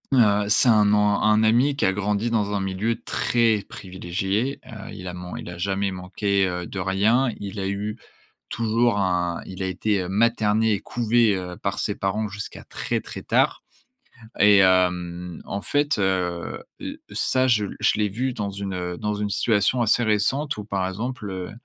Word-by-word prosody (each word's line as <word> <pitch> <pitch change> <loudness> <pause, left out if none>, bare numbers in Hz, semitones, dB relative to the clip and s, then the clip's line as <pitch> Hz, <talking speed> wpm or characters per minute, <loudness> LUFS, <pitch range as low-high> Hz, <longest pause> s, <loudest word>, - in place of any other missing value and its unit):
heu, 105 -4 +4
c'est 120 +3 +5
un 105 -2 +5
an 105 0 +3
un 105 +1 +4
ami 120 +6 +3
qui 145 - 0
a 95 - +2
grandi 105 +3 -1
dans 105 -3 +1
un 100 - 0
milieu 95 +4 -1
très 115 -3 +1
privilégié, 95 +7 -3
heu, 110 -5 -9
il 90 - -8
a 90 - -5
man 90 0 -7
il - - -8
a 85 - -9
jamais 95 +1 -1
manqué, 95 +1 0
heu, 90 -1 -3
de 95 - -6
rien, 105 +8 +2
il 100 0 -6
a 95 - -2
eu 105 +2 -3 0.5
toujours 115 0 +1
un 90 -3 0
il 95 0 -8
a 95 - -1
été, 95 +2 0
heu, 90 - -5
materné 110 +1 +2
et 100 - -1
couvé, 115 -2 +2
heu, 90 -1 -6
par - - -3
ses - - -1
parents 105 +3 -1
jusqu'à 100 0 -8
très, - - -3
très - - -8
tard - - +2 0.8
et 105 0 +6
hem, 90 -2 +1
en 100 +1 -4
fait, 145 +2 +1
heu 90 -3 -1 0.2
heu, - - -6
ça 130 0 +1
je 105 -5 +2
je - - +3
l'ai 105 -1 +1
vu 125 +6 -2
dans 105 -3 -3
une, 100 -1 -5
heu, 90 -1 -4
dans 105 +2 -2
une 105 0 -2
situation 110 +4 +2
assez 115 +1 +3
récente 130 +7 +1
où 105 - -6
par 95 -3 -1
exemple, 110 +2 -5
heu, 95 -1 -5
100 Hz, 190 wpm, -24 LUFS, 95-110 Hz, 0.8 s, et